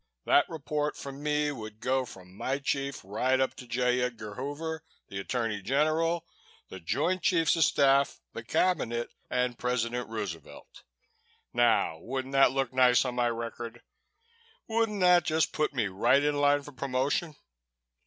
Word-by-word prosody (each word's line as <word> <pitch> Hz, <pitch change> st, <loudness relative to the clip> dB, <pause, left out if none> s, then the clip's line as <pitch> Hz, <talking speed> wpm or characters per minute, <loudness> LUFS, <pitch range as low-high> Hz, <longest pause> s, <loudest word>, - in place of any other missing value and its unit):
That -, -, +4 dB
report 150 Hz, -1 st, -2 dB
from 140 Hz, 0 st, -8 dB
me 150 Hz, 0 st, +1 dB
would 110 Hz, -5 st, -8 dB
go 130 Hz, +2 st, 0 dB
from 95 Hz, -4 st, -13 dB
my 130 Hz, +5 st, -1 dB
chief 140 Hz, -1 st, -2 dB
right 130 Hz, +7 st, 0 dB
up 130 Hz, -, +1 dB
to 125 Hz, -, -11 dB
J. 125 Hz, +1 st, +1 dB
Edgar 115 Hz, -4 st, -4 dB
Hoover, 150 Hz, +6 st, -5 dB, 0.3 s
the 100 Hz, -, -5 dB
Attorney 110 Hz, 0 st, -2 dB
General, 155 Hz, -, +1 dB, 0.4 s
the 95 Hz, -, -8 dB
Joint 175 Hz, -, 0 dB
Chiefs 165 Hz, -3 st, +3 dB
of 165 Hz, -, +3 dB
Staff, 140 Hz, 0 st, +3 dB
the 115 Hz, -, -6 dB
Cabinet 120 Hz, -4 st, 0 dB, 0.2 s
and 125 Hz, -1 st, -1 dB
President 125 Hz, -1 st, -1 dB
Roosevelt. 100 Hz, -7 st, -7 dB, 0.7 s
Now, 120 Hz, -9 st, +2 dB
wouldn't 130 Hz, +7 st, -4 dB
that 135 Hz, -2 st, +5 dB
look 135 Hz, -2 st, -1 dB
nice 125 Hz, 0 st, +5 dB
on 125 Hz, -, -2 dB
my 120 Hz, -1 st, +1 dB
record? 115 Hz, 0 st, -6 dB, 0.8 s
Wouldn't 225 Hz, -3 st, 0 dB
that 180 Hz, -1 st, +6 dB
just 160 Hz, 0 st, +1 dB
put 150 Hz, 0 st, 0 dB
me 125 Hz, -6 st, 0 dB
right 130 Hz, +9 st, +3 dB
in 145 Hz, 0 st, +1 dB
line 145 Hz, 0 st, +3 dB
for 145 Hz, -, -10 dB
promotion? 140 Hz, +4 st, -1 dB
130 Hz, 155 wpm, -29 LUFS, 120-150 Hz, 0.8 s, that